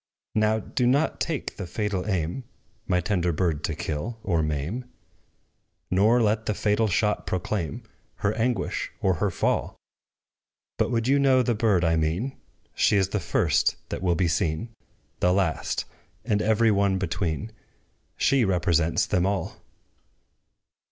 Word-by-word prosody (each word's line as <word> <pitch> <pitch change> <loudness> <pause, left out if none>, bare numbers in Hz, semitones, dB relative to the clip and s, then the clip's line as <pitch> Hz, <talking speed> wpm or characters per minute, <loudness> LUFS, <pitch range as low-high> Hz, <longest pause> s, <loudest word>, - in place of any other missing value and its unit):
Now 110 0 +2
do 120 +3 -1
not 140 +5 +1
take 160 -4 -3
the 95 - -5
fatal 100 0 -2
aim, 95 +5 -1 0.4
My 90 -1 +2
tender 90 -2 0
bird 80 -2 -1
to 80 - -2
kill, 80 +8 -4
or 85 -4 +1
maim; 75 - -2 1.1
Nor 110 +6 +4
let 110 +1 +1
the 105 - 0
fatal 105 +2 +1
shot 105 +2 0
proclaim 90 -4 -2 0.3
Her 105 - 0
anguish, 115 -4 -1
or 95 - +2
her 105 - +2
fall! 85 - -1 1.0
But, - - +2
would 115 -1 0
you 140 +2 +4
know 130 -2 +4
the 120 - +1
bird 105 -5 +2
I 80 0 +2
mean, 85 +13 -1 0.4
She 105 - +3
is 95 -1 +2
the 105 - -1
first 85 - +1
that - - -4
will 90 -2 +2
be 90 0 +1
seen 85 +5 -1 0.5
The 90 - +3
last 90 -5 0 0.4
and 105 -3 +1
every 110 +1 +3
one 100 -1 +2
between: 95 +1 -2 0.7
She 135 -3 +3
represents 85 -4 +2
them 90 -1 +1
all! 100 -4 -3
100 Hz, 145 wpm, -26 LUFS, 85-110 Hz, 1.1 s, Nor